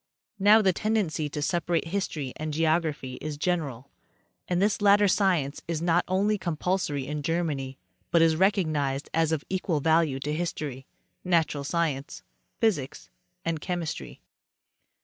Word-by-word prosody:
Now 210 +3 +6
the 190 -2 +4
tendency 195 -8 0
to 145 +1 -4
separate 170 0 0
history 160 -8 -3
and 155 -1 -4
geography 155 -5 0
is 150 -1 -4
general, 145 -6 -2 0.6
and 180 -1 0
this 205 +1 +1
latter 205 0 +5
science 180 -8 +1
is 165 -2 -1
not 170 +1 +2
only 200 +3 +1
compulsory 170 -4 -1
in 150 +2 -4
Germany, 145 -4 -2 0.3
but 170 -1 +4
is 160 -1 +4
recognized 155 -7 +1
as 160 0 +2
of 160 -1 -1
equal 185 -4 -1
value 160 -2 +2
to 150 +2 -2
history, 150 -5 -4 0.4
natural 165 -5 +1
science, 145 -3 -2 0.4
physics 165 -13 -1 0.3
and 165 -2 -1
chemistry. 175 -4 -4
165 Hz, 135 wpm, -27 LUFS, 145-180 Hz, 0.6 s, Now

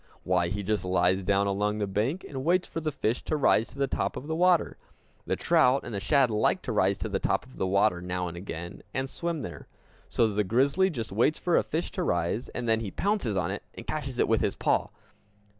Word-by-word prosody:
Why, 85 - +2
he 100 +4 -3
just 105 -1 0
lies 90 +1 +2
down 100 +1 +2
along 105 +1 0
the 105 - 0
bank, 110 - -1
and 135 -2 -5
waits 180 +4 +2
for - - -4
the 155 -1 -1
fish 115 -3 -1
to 155 - 0
rise 115 -5 +3
to - - -15
the 140 - +2
top 135 - -2
of 130 - -6
the 160 - -3
water. 180 0 +3 0.5
The - - +1
trout 130 +2 +3
and 120 - -7
the 100 - -2
shad 130 +4 +3
like 105 0 +1
to - - -3
rise - - +2
to - - -3
the - - -1
top - - 0
of 130 - -16
the 95 - 0
water 95 -2 +2
now 90 0 -2
and 85 - -6
again, 85 -1 -7
and 130 0 -1
swim 170 +2 -3
there. - - -8 0.4
So 115 - +3
the 105 0 0
grizzly 140 - +2
just 120 - -5
waits 120 +10 +2
for 175 - +1
a - - +5
fish 160 +3 -3
to 185 - -3
rise 85 - -1
and 120 -1 -4
then 110 0 +3
he 110 -3 -4
pounces 190 - -1
on 90 0 0
it 100 - -4
and - - -9
catches 135 -5 -4
it - - +2
with 115 - +2
his - - 0
paw. - - +1
115 Hz, 240 wpm, -28 LUFS, 95-140 Hz, 0.5 s, a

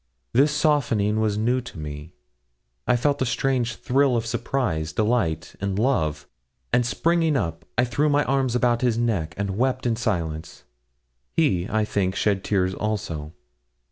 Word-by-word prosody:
This 140 +5 +4
softening 120 -9 +2
was 105 -2 +1
new 120 +4 +1
to 125 -7 -11
me. 75 +1 -7 0.7
I - - +4
felt 140 +3 +1
a - - +3
strange 120 -2 0
thrill 135 -1 +2
of 115 - -2
surprise, 115 - -1
delight, 105 -8 0
and 100 -1 -1
love, 100 - 0 0.5
and 125 - +4
springing 165 +4 +1
up, 85 - -3
I 120 - +4
threw 140 +5 +1
my 145 0 +3
arms 135 -2 0
about 120 -1 +2
his 120 -3 +2
neck 95 -9 -1
and 100 0 -2
wept 130 0 0
in 120 -2 +2
silence. 85 -9 -3 0.7
He, 105 - +1
I 110 -1 +1
think, 95 -3 -1
shed 100 -2 +1
tears 95 -2 +1
also. 85 -8 -3
115 Hz, 155 wpm, -24 LUFS, 95-130 Hz, 0.7 s, This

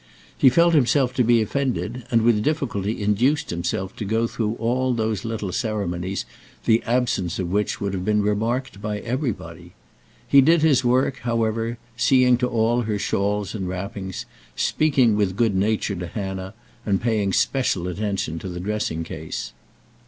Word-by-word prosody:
He 130 - +6
felt 170 +6 +4
himself 135 -2 +3
to 125 - +2
be 115 -1 +4
offended, 125 -1 -2
and 115 -2 +3
with 115 -2 +3
difficulty 115 -7 -1
induced 120 +9 +1
himself 90 +2 -3
to - - -4
go 110 +3 +1
through 110 -1 -2
all 125 +2 0
those 110 -3 -1
little 110 -4 -3
ceremonies 95 -3 -2 0.4
the 115 +1 +4
absence 120 -8 0
of 90 -2 -3
which 105 +2 0
would 100 -1 -2
have 90 -2 -3
been 105 +1 +2
remarked 110 +2 -1
by 105 0 -2
everybody. 95 - -4 0.5
He 140 - +7
did 160 +3 +4
his 145 -5 +4
work, 130 +2 +2
however, 115 -1 -1 0.2
seeing 125 0 +4
to 125 0 0
all 120 0 +1
her 110 -3 -1
shawls 100 0 -1
and 95 -4 -3
wrappings, 95 0 -5 0.3
speaking 135 -8 +2
with 100 -3 0
good 115 -1 +2
nature 100 +1 0
to 90 -1 -5
Hannah, 95 +1 -5 0.3
and 100 -3 +1
paying 110 -4 0
special 100 -7 +1
attention 90 -3 -2
to 95 - -6
the 90 0 -6
dressing 95 -4 -2
case. 80 -4 -6
110 Hz, 160 wpm, -23 LUFS, 95-120 Hz, 0.5 s, He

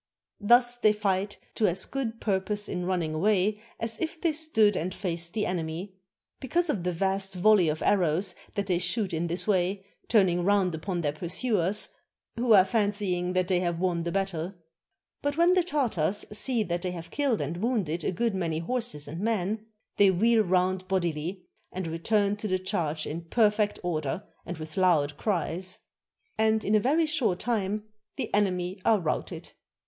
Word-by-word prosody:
Thus 240 +3 +4
they 215 -3 +4
fight 200 -1 -1 0.2
to 215 - +2
as 185 +1 +1
good 235 -5 -4
purpose 205 +1 -1
in 180 0 -3
running 175 -4 -1
away 205 +4 +1 0.2
as 225 0 -2
if 330 0 -3
they 335 -1 +1
stood 295 -10 +2
and 180 +3 -2
faced 170 -3 -3
the 215 -2 0
enemy, 175 +2 -3 0.5
because 335 +5 +1
of 195 -11 -3
the 180 - 0
vast 195 +2 -1
volleys 185 -2 +4
of 155 +1 -2
arrows 185 0 +2 0.2
that 200 -1 -1
they 180 -3 +1
shoot 185 +2 0
in 165 +1 -1
this 170 +2 0
way, 190 0 +1 0.2
turning 185 -6 +3
round 195 -2 +2
upon 175 +2 -3
their 145 -3 0
pursuers, 185 - +1 0.5
who 235 0 0
are 190 -3 +7
fancying 200 -4 0
that 185 -1 +1
they 185 -2 +2
have 175 -2 -1
won 180 -2 0
the 170 +1 -2
battle. 190 -1 -2 0.7
But 285 +1 -1
when 340 +2 +5
the 365 - +4
Tartars 230 - 0
see 235 +1 0
that 175 -3 -2
they 185 - -2
have 170 -1 -8
killed 275 -7 +1
and 150 +4 -3
wounded 185 -7 -1
a - - 0
good 230 +4 0
many 170 -4 -1
horses 195 -4 -1
and 160 +4 -6
men, 215 0 -1 0.3
they 200 -1 +6
wheel 220 +5 +3
round 185 0 +1
bodily, 175 -1 -2 0.3
and 185 0 -4
return 200 +5 0
to 210 - -3
the 185 -2 +1
charge 160 -4 -2
in 165 +3 -5
perfect 210 +2 +2
order 160 0 -2 0.2
and 175 -1 -5
with 155 +1 -8
loud 160 -6 +3
cries; 185 -1 -1 0.6
and 220 0 +2
in 210 - +1
a 215 - +6
very 300 +9 +2
short 260 - +1
time 210 -2 -1 0.3
the - - -4
enemy 185 -2 0
are 220 -2 +4
routed. 160 -4 -3
190 Hz, 175 wpm, -27 LUFS, 175-215 Hz, 0.7 s, are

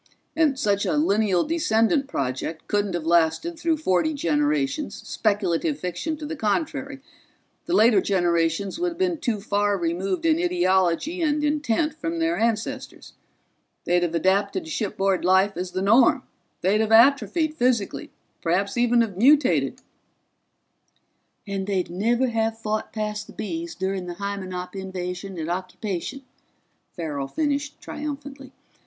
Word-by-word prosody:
And 310 -4 +2
such 205 -5 +1
a 300 - 0
lineal 210 - +2
descendant 290 -4 +1
project 140 - -3
couldn't 205 -3 0
have 170 -2 -3
lasted 170 - +2
through 330 -2 +1
forty 300 - +1
generations, 295 0 0
speculative 190 -8 -1
fiction 180 - -3
to 300 - -7
the 315 +2 -4
contrary 275 +4 -2 0.7
the 345 - +1
later 220 -3 +5
generations 175 - 0
would 350 -1 0
have - - -17
been 355 -3 0
too 235 -7 -1
far 205 0 0
removed 180 - -2
in 320 0 +3
ideology 325 - +1
and 300 -2 +1
intent 295 0 +1
from 325 +2 -4
their 330 +1 +1
ancestors. 225 -1 -3 0.7
They'd 175 0 +2
have 170 -1 -1
adapted 200 - +1
to 320 - -8
shipboard 195 - 0
life 190 +2 +3
as 180 +1 -3
the 185 +1 -3
norm. 245 +6 +5 0.4
They'd 200 +4 +2
have 220 0 -1
atrophied 285 +7 +4
physically, 245 -7 0 0.3
perhaps 195 +5 0
even 240 0 +4
have 210 -5 -2
mutated 275 +4 +3 0.8
" - - -45
"And 195 -1 -3
they'd 190 -4 -1
never 235 +8 +1
have 225 -1 -1
fought 215 -1 -3
past 210 -1 -4
the - - -13
Bees 330 +9 -5
during 190 -1 -3
the 175 - -5
Hymenop 185 -2 -5
invasion 190 0 -5
and 160 -1 -4
occupation," 185 +7 -4 0.7
Farrell 150 -5 -3
finished 290 - -2
triumphantly. 285 -2 -7
215 Hz, 140 wpm, -24 LUFS, 185-290 Hz, 0.8 s, later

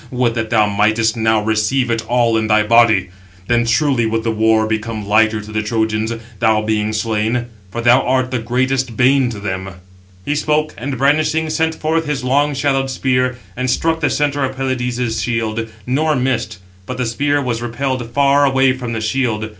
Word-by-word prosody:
would 125 -2 0
that 110 -1 -3
thou 110 -2 +3
mightst 110 +3 +1
now 110 -1 +1
receive 110 +4 0
it 115 -1 -1
all 120 -1 +2
in 110 -1 0
thy 110 0 +3
body. 110 -5 +4 0.3
Then 120 +2 +1
truly 120 -1 +1
would 110 0 -1
the 115 - 0
war 110 0 +2
become 110 -1 -3
lighter 110 +1 +3
to 105 +1 -11
the 110 0 -1
Trojans, 110 0 -1 0.3
thou 110 -1 +2
being 110 0 0
slain; 110 +2 -1 0.2
for 120 +5 -4
thou 120 +2 +5
art 130 0 0
the 130 - -1
greatest 130 +1 -1
bane 130 0 +3
to 110 -3 -6
them." 95 -1 -5 0.5
He 145 - 0
spoke, 150 +1 0
and, 130 +2 -5
brandishing, 155 +3 +1
sent 160 0 0
forth 160 0 -1
his 140 -3 -2
long 140 +3 +1
shadowed 135 -1 0
spear, 125 -1 0 0.2
and 130 +1 -2
struck 160 +6 0
the 155 - +1
centre 145 -1 0
of 130 0 -2
Pelides' 125 -3 -2
shield, 115 0 -2 0.2
nor 150 +5 +1
missed; 130 -5 -1 0.3
but 125 - -5
the 125 - -1
spear 145 +5 0
was 120 -4 -2
repelled 120 0 -3
far 140 +1 +3
away 135 -1 +3
from 125 -2 -5
the 110 - -3
shield. 110 -2 -1
120 Hz, 185 wpm, -17 LUFS, 110-135 Hz, 0.5 s, thou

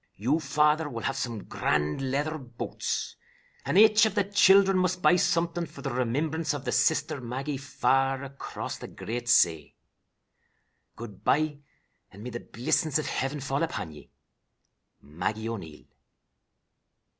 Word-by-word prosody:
You, 130 +10 +1
father, 150 0 +2
will 115 -4 -6
have 135 - -1
some 115 -5 -4
grand 75 - -1
leather 150 +4 -1
boots, 120 -3 -4 0.5
and - - 0
aich 215 +1 +7
of 205 - -5
the 205 - +3
children 195 0 +5
must 185 0 0
buy - - +6
something 170 -1 0
for - - -12
the 135 - -2
remimbrance 145 +6 -1
of 140 -1 -7
the 125 - -1
sister 155 -1 +1
Maggie 135 +4 -4
far 135 -1 0
across 140 0 -6
the - - -7
great 120 +1 -5
say. 80 -8 +3 1.2
"'Good 105 -5 -10
bye, 150 0 +1 0.5
and 100 +3 -12
may 125 - -6
the 120 - -5
blissings 130 +7 0
of 155 - -2
Hiven 135 +2 -2
fall 140 +1 -2
upon 165 - -3
ye. 75 - -14 0.9
"'MAGGIE 90 +10 -3
O'NEIL.'" 90 -10 -7
140 Hz, 145 wpm, -27 LUFS, 120-160 Hz, 1.2 s, aich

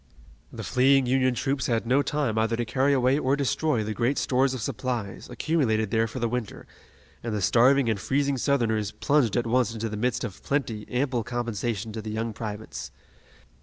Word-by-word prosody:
The - - -7
fleeing 135 +1 +4
Union 130 0 +2
troops 135 +1 -1
had 115 -1 0
no 130 +4 +3
time 145 -4 -1
either 110 +1 +1
to 120 0 -2
carry 130 +5 +1
away 130 +1 +3
or 135 -1 +2
destroy 140 -3 0
the 110 +1 -3
great 120 +5 0
stores 130 +1 +1
of 125 - -5
supplies, 120 -4 -4
accumulated 110 -10 0
there 115 0 +2
for 115 - -8
the 120 -2 0
winter, 120 -2 -4 0.6
and 115 -2 -3
the - - -1
starving 125 +6 +4
and 110 -3 0
freezing 140 +3 0
Southerners 110 -6 +1
plunged 140 -6 +1
at 120 - +1
once 115 -1 +1
into 115 0 -3
the 105 - -5
midst 125 +3 -1
of 105 -6 -6
plenty, 115 -7 -2
ample 125 -2 0
compensation 115 -2 -3
to 110 - -4
the 110 - -6
young 110 +1 -3
privates. 110 -1 -6
120 Hz, 190 wpm, -26 LUFS, 110-135 Hz, 0.6 s, fleeing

